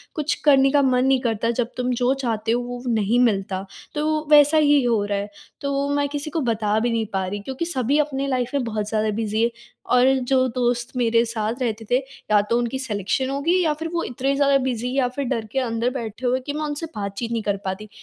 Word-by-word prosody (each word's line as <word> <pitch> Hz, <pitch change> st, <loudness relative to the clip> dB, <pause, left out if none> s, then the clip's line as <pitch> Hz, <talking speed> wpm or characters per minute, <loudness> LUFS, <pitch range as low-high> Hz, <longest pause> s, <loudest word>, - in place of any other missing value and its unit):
कुछ 305 Hz, -1 st, 0 dB
करने 270 Hz, -2 st, +5 dB
का 290 Hz, 0 st, +4 dB
मन 255 Hz, -1 st, +2 dB
नहीं 265 Hz, -1 st, +3 dB
करता, 230 Hz, -2 st, 0 dB
जब 240 Hz, +1 st, -4 dB
तुम 250 Hz, 0 st, 0 dB
जो 250 Hz, +2 st, +4 dB
चाहते 225 Hz, -2 st, -1 dB
हो, 240 Hz, +1 st, +1 dB
वो 245 Hz, 0 st, -6 dB
नहीं 220 Hz, +2 st, +2 dB
मिलता। 195 Hz, -5 st, +1 dB, 0.3 s
तो 305 Hz, 0 st, -1 dB
वैसा 295 Hz, +1 st, +7 dB
ही 290 Hz, -2 st, +4 dB
हो 230 Hz, -4 st, +2 dB
रहा 205 Hz, 0 st, -1 dB
है। 200 Hz, +1 st, -4 dB, 0.3 s
तो 280 Hz, -1 st, -2 dB
वो 280 Hz, 0 st, 0 dB
मैं 285 Hz, 0 st, +1 dB
किसी 290 Hz, +1 st, -4 dB
को 320 Hz, +1 st, -2 dB
बता 215 Hz, -1 st, 0 dB
भी 240 Hz, +2 st, 0 dB
नहीं 225 Hz, -1 st, 0 dB
पा 190 Hz, -1 st, 0 dB
रही 205 Hz, +2 st, -4 dB
क्योंकि 265 Hz, +10 st, -4 dB
सभी 280 Hz, -4 st, 0 dB
अपनी 275 Hz, -2 st, -1 dB
लाइफ़ 255 Hz, -2 st, -1 dB
में 275 Hz, -, +1 dB
बहुत 215 Hz, -3 st, -3 dB
ज़्यादा 215 Hz, 0 st, 0 dB
बिज़ी 220 Hz, 0 st, -1 dB
है 235 Hz, -, +3 dB, 0.5 s
और 250 Hz, +1 st, +5 dB, 0.2 s
जो 260 Hz, -1 st, +3 dB
दोस्त 245 Hz, 0 st, 0 dB
मेरे 230 Hz, -1 st, +3 dB
साथ 230 Hz, +2 st, -3 dB
रहते 225 Hz, -2 st, -2 dB
थे, 245 Hz, -, +5 dB, 0.3 s
या 210 Hz, -1 st, +6 dB
तो 235 Hz, -, +3 dB
उनकी 240 Hz, +2 st, -1 dB
सिलेक्शन 245 Hz, +1 st, -1 dB
हो 275 Hz, +1 st, -2 dB
गई 335 Hz, +4 st, +2 dB
है 370 Hz, -, +3 dB
या 315 Hz, -3 st, +2 dB
फिर 320 Hz, +2 st, -5 dB
वो 340 Hz, -, 0 dB
इतने 265 Hz, +3 st, -1 dB
ज़्यादा 280 Hz, 0 st, +4 dB
बिज़ी 250 Hz, -1 st, -2 dB
या 260 Hz, -2 st, +3 dB
फिर 280 Hz, -, -2 dB
डर 230 Hz, -2 st, -2 dB
के 270 Hz, -, 0 dB
अंदर 235 Hz, -1 st, 0 dB
बैठे 235 Hz, -2 st, -6 dB
हुए 250 Hz, +1 st, +2 dB
कि 285 Hz, -, -3 dB
मैं 305 Hz, +1 st, -3 dB
उनसे 295 Hz, +2 st, -3 dB
बातचीत 205 Hz, +3 st, -4 dB
नहीं 230 Hz, -1 st, -1 dB
कर 205 Hz, -1 st, 0 dB
पाती। 190 Hz, +3 st, -4 dB
245 Hz, 245 wpm, -22 LUFS, 225-275 Hz, 0.5 s, वैसा